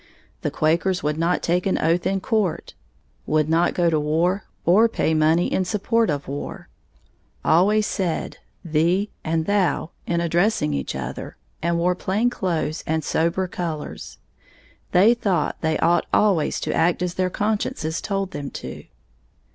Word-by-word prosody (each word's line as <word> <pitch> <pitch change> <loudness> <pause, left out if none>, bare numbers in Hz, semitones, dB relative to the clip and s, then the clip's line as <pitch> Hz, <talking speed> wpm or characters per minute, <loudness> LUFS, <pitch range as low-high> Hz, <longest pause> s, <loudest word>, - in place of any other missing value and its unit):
The - - -1
Quakers 175 +4 +1
would 150 +1 -1
not 170 +2 +1
take 175 +2 +1
an 190 - +1
oath 165 +2 +1
in 195 0 0
court; 215 -6 -1 0.5
would 155 -1 +2
not 165 +2 +2
go 175 -1 +2
to 160 -2 +2
war 170 +6 0 0.2
or 210 +7 +5
pay 160 - 0
money 160 +2 +3
in 190 - 0
support 225 +4 +1
of 145 -2 -2
war; 140 +2 -6 0.8
always 205 +6 +4
said 180 -6 -2 0.3
"thee" 170 +6 +1
and 160 0 0
"thou" 195 -4 +1 0.2
in 170 0 +1
addressing 170 - +1
each 70 -2 -3
other, 65 0 -6 0.2
and 170 +1 +1
wore 175 +2 +2
plain 205 +6 0
clothes 170 -6 -2
and 160 0 0
sober 170 +3 0
colors. 165 -4 -5 0.7
They 200 +6 +6
thought 195 -9 -1
they 160 -1 +1
ought 170 +1 +2
always 195 -8 +2
to - - -2
act 170 +2 +2
as 180 -1 -2
their 185 0 0
consciences 200 -6 -2
told 195 -1 -2
them 140 -1 -5
to. - - -8
175 Hz, 155 wpm, -23 LUFS, 160-190 Hz, 0.8 s, They